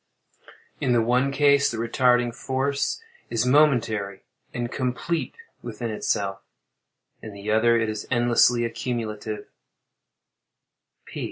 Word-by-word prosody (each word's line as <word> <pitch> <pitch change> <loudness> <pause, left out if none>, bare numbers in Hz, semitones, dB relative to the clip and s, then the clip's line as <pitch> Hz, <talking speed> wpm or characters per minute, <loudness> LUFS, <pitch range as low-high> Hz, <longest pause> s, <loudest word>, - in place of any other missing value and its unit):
In 125 - +1
the 120 - +3
one 125 +4 +2
case, 140 0 +4
the 115 - -4
retarding 120 +1 +2
force 135 - -2 0.3
is 115 +1 0
momentary 120 -8 +2 0.3
and 120 0 -4
complete 130 +6 -2 0.3
within 115 0 -5
itself—in 100 +1 -6
the 100 +1 -5
other 115 +2 +4
it 115 -1 0
is 110 -1 -5
endlessly 120 -1 +3
accumulative. 110 -3 -4
120 Hz, 100 wpm, -24 LUFS, 110-130 Hz, 0.3 s, case